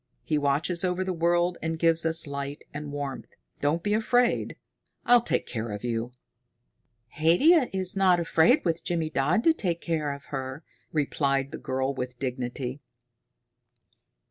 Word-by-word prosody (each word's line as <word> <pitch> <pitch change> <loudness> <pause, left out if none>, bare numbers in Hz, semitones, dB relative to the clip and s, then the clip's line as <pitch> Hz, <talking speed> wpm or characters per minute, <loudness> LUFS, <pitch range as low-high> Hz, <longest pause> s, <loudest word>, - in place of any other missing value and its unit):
He 150 - 0
watches 150 +6 +1
over 180 0 0
the 185 0 -2
world 175 +1 +1
and 160 0 -2
gives 165 0 +3
us 165 +1 -1
light 140 0 -5
and 145 0 -6
warmth. 145 -2 -5 0.3
Don't 155 +4 0
be 205 - 0
afraid. 240 +3 +1 0.5
I'll 240 0 +6
take - - -1
care 115 -1 -4
of 105 +1 -6
you." 120 0 -2 1.1
"Haidia 255 - +5
is 190 -1 -1
not 185 -2 +4
afraid 170 - +3
with 165 -1 0
Jimmydodd 165 - 0
to 330 - +5
take 175 - -2
care 155 -4 -1
of 140 0 -8
her," 135 +3 -4 0.3
replied 140 -2 0
the - - -6
girl 130 +1 -2
with 125 -2 -5
dignity. 125 +1 -4
160 Hz, 145 wpm, -27 LUFS, 140-175 Hz, 1.1 s, I'll